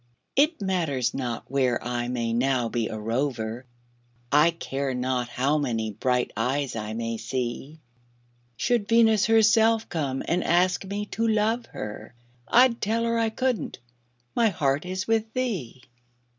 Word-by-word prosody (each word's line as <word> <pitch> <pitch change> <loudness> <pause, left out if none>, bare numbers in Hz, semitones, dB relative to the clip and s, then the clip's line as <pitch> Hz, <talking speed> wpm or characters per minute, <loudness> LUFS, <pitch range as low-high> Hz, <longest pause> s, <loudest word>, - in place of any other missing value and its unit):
It 295 - +2
matters 155 -10 0
not 125 -3 -3
where 130 -2 +1
I 120 0 -2
may 120 -2 -2
now 125 -1 +1
be 115 -2 -1
a 110 - -5
rover, 115 +1 -2 0.7
I 150 +3 +6
care 140 -5 -3
not 125 -1 -1
how 140 +5 +1
many 115 -6 -1
bright 125 +4 0
eyes 130 +4 -1
I 110 -1 -4
may 115 0 -3
see; 130 +6 -4 0.8
Should 230 - +1
Venus 225 -2 +4
herself 225 0 +4
come 140 -5 -2
and 175 +2 +1
ask 180 +2 +2
me 200 +2 -3
to 230 0 0
love 220 +2 +1
her, 105 +3 -8 0.3
I'd 245 -1 +4
tell 225 +3 0
her 230 0 +1
I 225 -1 +2
couldn't 250 +1 -2 0.6
my 230 -2 +4
heart 145 -2 0
is 185 +1 -3
with 225 0 +1
thee. 190 - -3
140 Hz, 145 wpm, -26 LUFS, -, 0.8 s, I